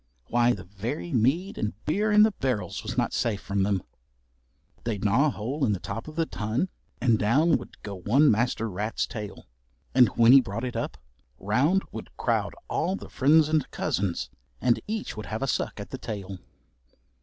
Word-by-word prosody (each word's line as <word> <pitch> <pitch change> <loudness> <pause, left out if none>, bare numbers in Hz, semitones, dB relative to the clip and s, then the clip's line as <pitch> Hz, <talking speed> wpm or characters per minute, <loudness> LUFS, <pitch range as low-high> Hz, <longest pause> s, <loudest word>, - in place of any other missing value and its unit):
Why 120 +1 +4
the 95 - -7
very 110 - -5
mead 140 - +1
and 110 - -1
beer 210 +7 +1
in 210 0 +7
the 220 - +4
barrels 130 - -2
was - - -5
not - - +1
safe 110 -4 0
from 100 -1 -2
them. 95 -2 +1 1.0
They'd 110 -3 -2
gnaw 120 +9 +4
a - - +3
hole 130 +4 -3
in 110 -5 +3
the 95 - -2
top 115 +7 -6
of 155 - -9
the 165 -1 +1
tun, 115 - -2 0.3
and 115 -4 +3
down 145 +10 +4
would - - -12
go 100 -2 -6
one 135 +11 +4
master 115 0 +1
rat's 105 +2 -2
tail, 105 -3 -7 0.5
and 125 -2 +7
when 115 0 +6
he 135 +1 +9
brought 115 -1 -5
it 125 - -4
up - - -3 0.4
round 140 - +2
would - - -7
crowd - - 0
all 180 +4 0
the - - -9
friends 150 +3 +4
and 155 -3 +1
cousins, 95 -2 -2 0.3
and 120 - +2
each 220 0 -3
would 110 - -7
have 110 +4 -3
a - - 0
suck - - -1
at - - -7
the - - -5
tail. 100 -3 -6
120 Hz, 190 wpm, -27 LUFS, 105-150 Hz, 1.0 s, he